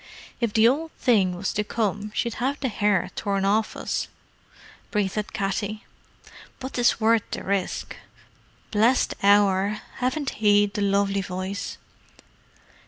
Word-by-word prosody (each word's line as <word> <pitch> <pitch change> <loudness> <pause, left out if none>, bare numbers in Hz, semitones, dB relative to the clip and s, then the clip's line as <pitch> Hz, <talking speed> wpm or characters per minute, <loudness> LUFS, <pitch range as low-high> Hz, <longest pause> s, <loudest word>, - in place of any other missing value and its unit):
"If 235 -3 0
the 220 +1 +6
Ould 305 +6 +1
Thing 195 -8 +3
was 185 +2 -3
to 210 - 0
come 210 -1 -2
she'd 235 -2 -1
have 275 +3 0
the 265 - -1
hair 205 -3 +1
torn 195 -1 -1
off 215 +2 +1
of - - -7
us," - - -2 0.8
breathed 210 0 -1
Katty. 205 +1 -3 0.7
"But 260 0 -6
'tis 240 -2 +2
worth 225 0 +4
the - - -5
rishk. 195 -1 -2 0.8
Blessed 230 +4 +3
Hour, 200 0 +4 0.2
haven't 260 +3 -1
he 205 -1 +5
the 205 +1 -4
lovely 200 0 +1
voice?" 185 +2 -5
205 Hz, 135 wpm, -25 LUFS, 195-230 Hz, 0.8 s, the